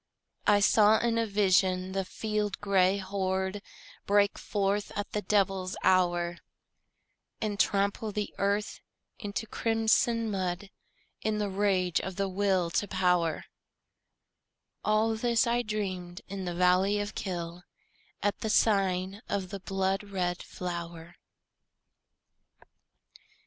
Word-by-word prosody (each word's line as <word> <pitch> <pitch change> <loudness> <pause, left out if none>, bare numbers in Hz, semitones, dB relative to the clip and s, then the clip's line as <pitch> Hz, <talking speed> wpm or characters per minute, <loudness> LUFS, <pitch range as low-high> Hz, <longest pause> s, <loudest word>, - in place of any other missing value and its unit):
I 205 0 +5
saw 215 +1 +5
in 230 0 +1
a 230 - 0
vision 190 -2 +2
the 195 0 -1
field 210 +1 -3
gray 195 -1 +3
horde 190 0 -2 0.5
Break 200 0 +3
forth 200 0 -1
at 205 0 -4
the 210 - -1
devil's 195 -2 0
hour, 175 -2 +2 1.0
And 205 -2 -2
trample 200 +2 +1
the 210 0 -3
earth 200 +2 0 0.4
into 205 +1 -4
crimson 225 0 +1
mud 190 0 -3 0.5
In 215 -1 0
the 205 -2 -1
rage 190 -3 +1
of 190 -1 -5
the 195 +1 0
Will 190 -3 +1
to 205 - 0
Power, 180 -4 +1 1.4
All 215 +1 +2
this 235 +2 +2
I 240 +1 +1
dreamed 185 -5 -4
in 195 0 -5
the 175 -1 -3
valley 185 +3 +3
of 205 0 -3
Kyll, 175 -4 -4 0.6
At 205 0 0
the 220 - -3
sign 195 -2 +2
of 190 -2 -2
the 200 +1 -6
blood 195 0 -1
red 180 -3 -2
flower. 170 -1 -6
195 Hz, 120 wpm, -29 LUFS, 185-210 Hz, 1.4 s, I